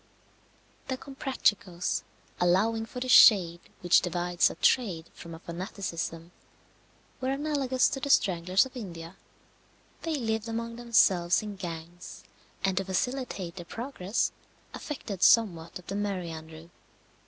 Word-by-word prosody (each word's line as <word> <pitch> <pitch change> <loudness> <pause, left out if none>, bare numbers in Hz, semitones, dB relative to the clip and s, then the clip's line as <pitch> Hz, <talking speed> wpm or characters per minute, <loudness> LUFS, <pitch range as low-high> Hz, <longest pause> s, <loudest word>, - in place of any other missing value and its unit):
The 260 - -2
Comprachicos, 210 -10 -1 0.4
allowing 215 +6 +2
for 250 - -7
the 255 - -3
shade 180 -8 +7 0.2
which 175 -1 +5
divides 175 0 +1
a - - -8
trade 180 -10 +1
from 165 -1 -10
a - - -11
fanaticism, 170 -2 -5 0.9
were 260 - -2
analogous 275 -2 +1
to 270 - -4
the 280 - -4
Stranglers 185 -3 +3
of 265 - -12
India. 170 -6 -8 0.9
They 325 -2 -2
lived 225 -4 -2
among 230 +1 -4
themselves 195 -7 +3
in 210 -1 -6
gangs, 170 -1 -8 0.4
and 190 -1 0
to 195 - +2
facilitate 195 -3 -3
their 175 - -7
progress, 225 -1 -2 0.4
affected 215 - -6
somewhat 175 -7 +3
of 180 - -14
the 195 - -5
merry 195 -4 -2
andrew. 160 +1 -10
195 Hz, 130 wpm, -28 LUFS, 175-240 Hz, 0.9 s, shade